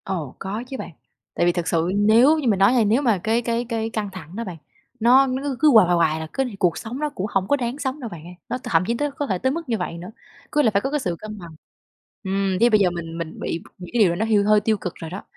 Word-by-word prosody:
Ồ, 170 -8 -4
có 205 +4 -4
chứ 265 - -6
bạn. - - -7 0.4
Tại - - +2
vì 175 - +4
thực 175 -1 -3
sự 170 +1 +1
nếu 225 +9 +5
như 280 - -2
mình 205 -4 +2
nói 195 +5 +5
hay 240 -4 +3
nếu 225 +6 +2
mà 230 -7 +2
cái 225 +2 +1
cái 235 0 -1
cái 225 -1 -2
căng 215 -3 -3
thẳng 180 -2 -10
đó 230 - -3
bạn, 180 -6 -7 0.4
nó 255 +4 +5
nó 260 +1 -2
cứ 285 -2 -2
cứ 305 -1 +5
hoài 220 -6 +7
hoài 175 - +3
hoài 160 -2 +2
là 160 - -5
cứ 270 - +1
này 245 -6 -6
cuộc 180 -4 +2
sống 240 +3 -6
nó 300 0 -1
cũng 205 -10 -4
hổng 195 -1 0
có 285 - +3
đáng 245 -1 -3
sống 270 0 -3
đâu 240 -5 -6
bạn 170 -4 -10
ơi, 180 +1 -11
nó - - -1
t - - -17
thậm 165 0 +2
chí 235 - +1
tới 290 +1 -1
có 280 +1 -4
thể 190 - 0
tới 260 +7 0
mức 330 -1 -5
như 230 - +1
vậy 180 -3 -4
nữa, 180 +4 -9 0.4
cứ 295 - +3
là 225 - +3
phải 200 -1 +1
có 270 - -3
cái 295 - 0
sự 180 -10 -2
cân 215 0 -8
bằng. 170 -2 -10 0.7
Ừm, 195 -1 0
với 235 - +5
bây 215 -2 +4
giờ 190 -3 +4
mình 165 -1 -6
mình 165 -1 -6
bị 165 - -4
những 180 -1 -10
cái 240 - +2
điều 175 -3 +2
nó 215 +5 -1
hiu 215 -2 +3
hơi 210 0 +5
tiêu 215 +1 +1
cực 180 -3 -6
rồi 165 - -8
đó, 190 +4 -7
215 Hz, 310 wpm, -22 LUFS, 180-245 Hz, 0.7 s, hoài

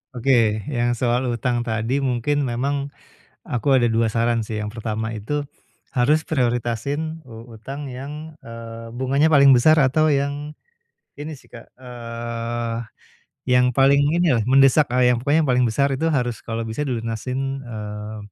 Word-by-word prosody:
Oke, 115 -4 +2
yang 120 -2 0
soal 120 +2 0
hutang 120 0 -1
tadi 115 +5 -1
mungkin 135 +2 0
memang 140 +4 -2 0.6
aku 135 +3 +1
ada 120 -3 +2
2 115 0 +2
saran 115 +1 +1
sih. 110 0 -5
Yang 105 0 -3
pertama 110 0 -3
itu 145 +8 -3 0.5
harus 150 +5 +2
prioritasin 135 +4 -1
u 115 +1 -11
utang 135 +5 -7
yang, 150 +5 -8
eee, 115 0 -9
bunganya 135 +4 +2
paling 140 -3 +6
besar 145 +5 +5
atau 155 +2 +3
yang 145 +1 -1 0.7
ini 150 -1 -6
sih - - -23
Kak. 115 - -12
Eee, 120 -1 -5 0.7
yang 125 0 +4
paling 135 +3 +4 0.2
inilah, 140 -11 +3
mendesak, 135 +1 +5
eee, 125 0 +4
yang 120 - -4
pokoknya 150 +3 +2
yang - - +1
paling 125 - +3
besar 135 +4 +1
itu 160 +5 0
harus 120 -6 -1
kalau 115 0 -4
bisa 110 +6 -3
dilunasin, 130 +2 -3
eee, 105 -2 -7
125 Hz, 150 wpm, -22 LUFS, 115-140 Hz, 0.7 s, paling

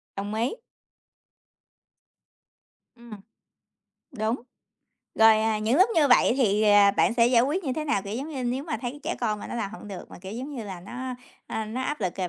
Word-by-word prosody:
Đồng 200 +1 -4
ý. 230 - -1 2.4
Ừm. 235 -1 -15 1.0
Đúng, 225 -2 -1 0.8
rồi, 220 -1 +6
à, 220 -1 +1
những 220 +5 +1
lúc 380 - +6
như 300 -3 +4
vậy 245 -1 +5
thì, 215 -5 +2
ờ, 205 -1 +6
bạn 235 - +3
sẽ 235 -1 +4
giải 240 -1 +4
quyết 320 +8 -1
như 265 - -1
thế 305 +4 -3
nào? 290 -10 0
Kiểu 200 +1 -6
giống 275 +6 -4
như, 270 -5 -4
nếu 255 +3 -2
mà 310 -2 -3
thấy 260 +3 -5
trẻ - - -2
con 215 -3 -1
mà - - -8
nó - - -6
làm 215 -4 -3
hổng 215 -1 -10
được, 190 -3 -9
mà, - - -11
kiểu 190 +2 -8
giống 255 +6 -6
như 235 -4 -5
là, 190 -3 -7
nó, 250 +7 -6 0.3
a, 220 0 -3
nó 220 +4 -5
áp 295 0 -3
lực 185 -3 -2
rồi 185 -2 -2
230 Hz, 210 wpm, -26 LUFS, 210-260 Hz, 2.4 s, rồi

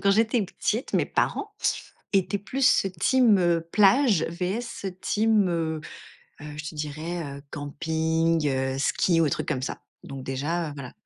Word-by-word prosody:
quand 200 - +4
j'étais 225 +2 +3
petite, 215 +5 -2
mes - - +3
parents 415 0 -1 0.6
étaient 195 +1 +2
plus 250 0 +2
team, 245 -4 +5
heu, 175 -2 +2
plage, 210 - +5
vs 190 +3 -4
team, 215 -2 +2
heu, 160 -2 -1 0.6
heu 150 0 -8
je 150 0 -5
te - - -14
dirais, 155 +3 -4
heu, 140 - -13
camping, 160 +2 0
heu, 130 0 -1
ski 165 +4 +2
ou 160 - +3
truc - - -3
comme 130 - -1
ça. - - -5 0.2
Donc, 135 -1 -7
déjà, 150 +5 -2
heu, - - -7
voilà. 130 -3 -8
170 Hz, 155 wpm, -26 LUFS, 150-205 Hz, 0.6 s, team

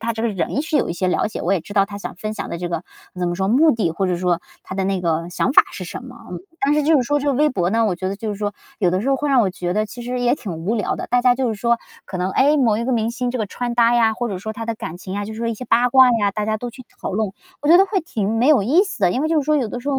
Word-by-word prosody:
他 230 +1 -1
这 225 - -5
个 235 - +1
人 210 - -2
是 310 -1 -1
有 - - +1
一 - - -1
些 185 +1 -2
了 180 - +1
解， - - -6
我 180 - +1
也 185 - +1
知 205 - -11
道 195 -1 +4
他 200 0 -8
想 200 - -7
分 215 +2 -4
享 - - -5
的 170 - -4
这 175 0 -3
个 170 0 -3 0.3
怎 180 -1 -1
么 175 - -2
说， 190 0 0
目 290 +9 +5
的 205 - 0
或 190 +2 -1
者 180 - 0
说 175 -1 0 0.2
他 190 - -7
的 190 - -1
那 190 -1 0
个 165 -1 -1
想 255 - 0
法 - - +8
是 - - -6
什 - - -7
么， - - -11
嗯。 - - -6 0.2
但 285 +2 +3
是 300 - +2
就 315 +2 +3
是 255 - +3
说 290 +4 +1
就 285 0 0
是 260 - 0
微 300 0 +4
博 180 -8 0
呢， 225 0 +2
我 185 - 0
觉 185 +2 -5
得 195 - -4
就 220 +1 -5
是 205 - -2
说 205 0 -3 0.3
有 180 -5 +2
的 185 - 0
时 255 - -2
候 270 - +3
会 290 +1 -2
让 260 -3 +5
我 200 - +2
觉 180 -1 -3
得 215 +2 0
其 240 +3 -9
实 250 +1 -3
也 245 +2 +3
挺 210 -10 -6
无 170 +8 -2
聊 210 - -1
的， - - -5
大 245 0 +2
家 250 -1 +5
就 255 -1 0
是 220 - -1
说， 235 +3 +1 0.3
可 185 - -6
能 185 +1 -1
诶， 290 +2 +4
某 225 -5 +3
一 235 - -2
个 260 - 0
明 225 -1 +1
星 245 0 -2
这 255 - -3
个 215 - -1
穿 240 +4 -4
搭 235 0 +4
呀， 225 -2 +4
或 240 +2 -3
者 190 -3 -4
说 220 +3 -5
他 225 +1 -6
的 230 - -1
感 175 -5 -7
情 185 +1 -7
呀， 205 0 -2
就 220 - -6
是 220 - -8
说 230 0 -1
一 230 - -1
些 250 - -8
八 245 +1 +3
卦 260 0 +6
呀， 205 -1 +2
大 210 0 -2
家 215 0 -1
都 245 - -5
去 245 +1 -11 0.2
讨 - - -4
论。 210 -1 -1 0.3
我 295 - -1
觉 345 +2 +8
得 390 - +5
会 390 0 0
挺 215 - -2
没 250 - +3
有 265 -10 +5
意 305 - +4
思 365 - -6
的， 180 -3 +4
因 260 +9 -1
为 315 - 0
就 320 -2 +2
是 - - -5
说 305 0 +3
有 245 -6 0
的 245 - -5
时 280 - -5
候 270 -1 +1
225 Hz, 390 characters per minute, -21 LUFS, 195-250 Hz, 0.3 s, 法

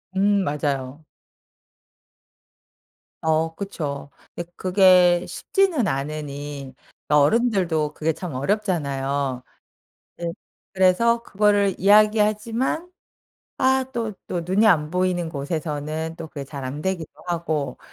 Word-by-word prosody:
음 200 0 +3
맞아요. 145 -1 -3 2.2
어 160 0 +1
그쵸. 150 -8 -5 0.2
근데 175 0 -6
그게 180 -2 +5
쉽지는 320 - +1
않으니 145 -1 -5 0.4
어른들도 160 -1 +2
그게 160 +1 -1
참 175 -1 -6
어렵잖아요. 140 -6 -1 0.8
예 170 - -4 0.5
그래서 215 +5 +3
그거를 205 -2 +2
이야기하지만 215 - +3 0.7
아 265 0 +3
또 230 -4 -2
또 175 - -2
눈이 190 +6 +2
안 155 -7 +3
보이는 180 -1 0
곳에서는 155 +1 -4
또 165 - -7
그게 150 -2 -7
잘 135 0 -7
안 140 +4 -5
되기도 185 -4 -2 0.2
하고 160 -6 -2
170 Hz, 220 characters per minute, -23 LUFS, 145-205 Hz, 2.2 s, 그게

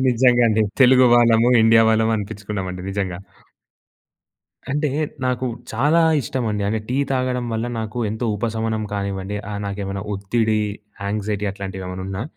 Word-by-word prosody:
నిజంగా 125 0 +4
అండి. 110 0 +2 0.2
తెలుగు 130 0 +7
వాళ్ళము, 120 0 +5
ఇండియా 115 0 +6
వాళ్ళము 110 0 +2
అనిపించుకున్నామండి 100 -3 -5
నిజంగా. 95 -3 -3 1.5
అంటే 150 0 0 0.3
నాకు 125 0 0 0.3
చాలా 145 +9 +3 0.2
ఇష్టమండి. 110 -4 -2
అంటే 110 +1 0
టీ 125 - -1 0.2
తాగడం 130 -1 -1
వల్ల 115 +2 -2
నాకు 110 +2 -5
ఎంతో 110 +2 -3
ఉపశమనం 110 0 -2
కానివ్వండి, 100 0 -3
ఆహ్, 100 0 -4
నాకేమైనా 100 -1 -4
ఒత్తిడి, 110 +2 0 0.5
యాంక్సైటీ 105 0 -2
అట్లాంటివేమన్నా 95 -1 -6
ఉన్నా 95 +3 -4
110 Hz, 125 wpm, -21 LUFS, 100-120 Hz, 1.5 s, తెలుగు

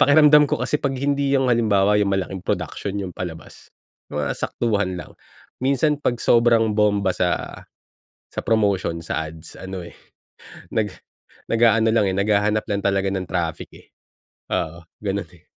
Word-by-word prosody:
pakiramdam 150 0 +7
ko - - +1
kasi 150 - 0
'pag 135 -2 -1
hindi 140 0 +1
yung 130 -1 +1
halimbawa, 105 -3 +3
yung 100 - +2
malaking 95 -1 -2
production 100 - -3
yung 95 -3 -4
palabas, 80 -2 -8 0.4
yung 75 0 -2
mga 70 - -1
saktuhan 100 -6 -1
lang. 90 - -9 0.5
Minsan 140 +3 +1
'pag 120 - 0
sobrang 115 -2 +4
bomba 105 -3 +2
sa 90 0 -2 0.7
sa - - -5
promotion, 100 -6 +1
sa 80 0 -3
ads, 80 +1 -13
ano 95 -2 -7
eh, - - -12 0.8
nag 110 -2 +1 0.6
nag-aano 115 -1 +4
lang, 110 -3 +3
eh, - - -3
naghahanap 105 +1 +2
lang 100 -1 -2
talaga 100 0 +1
ng 95 -2 -3
traffic, 85 -3 -3
eh. - - -16 0.7
Oo, 85 +1 -2 0.2
ganun, 100 -3 -2
eh. 90 -1 -20
100 Hz, 155 wpm, -22 LUFS, 95-115 Hz, 0.8 s, pakiramdam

